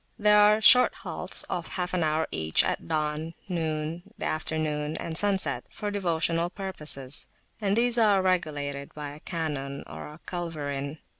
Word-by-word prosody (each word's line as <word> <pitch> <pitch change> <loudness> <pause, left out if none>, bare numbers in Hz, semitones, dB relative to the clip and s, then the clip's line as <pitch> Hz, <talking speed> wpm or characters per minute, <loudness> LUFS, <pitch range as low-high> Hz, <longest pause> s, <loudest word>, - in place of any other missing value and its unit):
There 210 0 +5
are 210 +1 +5
short 250 +3 +7
halts, - - 0
of - - -4
half 180 0 -2
an 180 -2 +1
hour 155 +1 +1
each, 80 0 +2
at 85 - -2
dawn, 155 - -2
noon, 160 -2 -2 0.2
the - - -4
afternoon, 155 -1 -2
and 165 - -5
sunset, 190 -11 +1
for 205 -1 -5
devotional 170 -3 +1
purposes, 155 -9 0 0.3
and 200 0 +1
these 240 0 +3
are 210 -3 +5
regulated 145 -6 -1
by 150 -1 -5
a 145 +1 -10
cannon 145 -5 -4
or - - -8
a 150 +2 -12
culverin. 150 -5 -4
160 Hz, 155 wpm, -27 LUFS, 150-190 Hz, 0.3 s, short